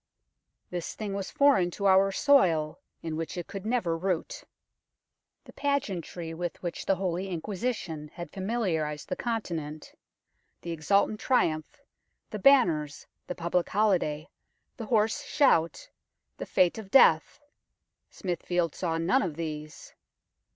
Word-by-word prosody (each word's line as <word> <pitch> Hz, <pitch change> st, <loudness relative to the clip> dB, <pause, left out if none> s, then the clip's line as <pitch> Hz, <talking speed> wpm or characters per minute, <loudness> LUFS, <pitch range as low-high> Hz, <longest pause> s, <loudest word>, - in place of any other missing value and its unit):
This 175 Hz, -2 st, -4 dB
thing 210 Hz, -2 st, -4 dB
was 195 Hz, -1 st, -4 dB
foreign 280 Hz, -, +4 dB
to 200 Hz, -, -3 dB
our 195 Hz, +1 st, +5 dB
soil, 185 Hz, -, +3 dB, 0.2 s
in 160 Hz, -1 st, -3 dB
which 165 Hz, +3 st, -4 dB
it 175 Hz, -, -4 dB
could 195 Hz, +1 st, -7 dB
never 225 Hz, -9 st, 0 dB
root. 180 Hz, 0 st, -3 dB, 1.0 s
The -, -, -15 dB
pageantry 185 Hz, -, -2 dB
with 175 Hz, 0 st, -4 dB
which 175 Hz, -, -5 dB
the 195 Hz, -, +3 dB
Holy 185 Hz, 0 st, -2 dB
Inquisition 180 Hz, -4 st, -4 dB
had 175 Hz, 0 st, -7 dB
familiarized 185 Hz, -8 st, -2 dB
the -, -, -1 dB
Continent, 165 Hz, -10 st, -4 dB, 0.7 s
the 170 Hz, -, -5 dB
exultant 200 Hz, +6 st, +1 dB
triumph, 160 Hz, -, 0 dB, 0.5 s
the 215 Hz, -, -4 dB
banners, 170 Hz, -, +3 dB, 0.2 s
the 180 Hz, -, -4 dB
public 170 Hz, +1 st, -1 dB
holiday, 180 Hz, -7 st, +1 dB, 0.5 s
the 225 Hz, -3 st, -7 dB
hoarse 220 Hz, -2 st, +2 dB
shout, 170 Hz, -, +2 dB, 0.5 s
the -, -, -6 dB
fete 180 Hz, +4 st, +2 dB
of 205 Hz, -3 st, -9 dB
Death 165 Hz, -10 st, +5 dB, 0.7 s
Smithfield 175 Hz, -2 st, -2 dB
saw 165 Hz, -3 st, -2 dB
none 185 Hz, +12 st, +2 dB
of 170 Hz, -6 st, -3 dB
these. 155 Hz, -2 st, -7 dB
180 Hz, 130 wpm, -28 LUFS, 165-215 Hz, 1.0 s, our